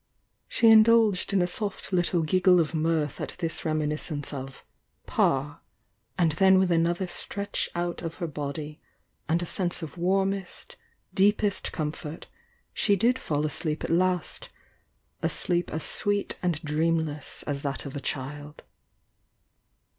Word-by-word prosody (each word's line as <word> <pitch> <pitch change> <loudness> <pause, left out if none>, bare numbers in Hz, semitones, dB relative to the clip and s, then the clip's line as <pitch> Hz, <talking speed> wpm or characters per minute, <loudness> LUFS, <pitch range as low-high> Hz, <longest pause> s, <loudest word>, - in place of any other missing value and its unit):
She 230 - +3
indulged 220 -3 +6
in 195 -2 +3
a - - +2
soft 200 +2 -3
little 175 -1 +2
giggle 180 +3 +4
of 165 0 0
mirth 155 -3 0
at - - -4
this 165 -2 -3
reminiscence 150 -1 -2
of 135 -1 -8 0.4
"Pa," 145 +4 0 0.6
and 170 -3 +3
then 190 +4 +5
with 185 -1 +3
another 170 +2 +2
stretch 200 +3 -3
out 175 0 -2
of 165 -1 -5
her 175 - -4
body, 150 0 -5 0.5
and 170 +2 +2
a - - -3
sense 175 0 -1
of 160 +3 -8
warmest, 195 - -1 0.4
deepest 205 0 +2
comfort, 155 0 -5 0.5
she 205 - +3
did 240 +6 +2
fall 150 -1 -1
asleep 155 +1 -2
at - - -2
last 180 -1 0 0.4
— - - -44
a - - +1
sleep 175 0 -1
as 160 - -3
sweet 205 0 +1
and 175 -4 0
dreamless 155 -1 -1
as 140 -2 -3
that 140 0 -3
of 140 - -7
a - - -2
child. 145 +3 -4
170 Hz, 145 wpm, -27 LUFS, 150-190 Hz, 0.6 s, indulged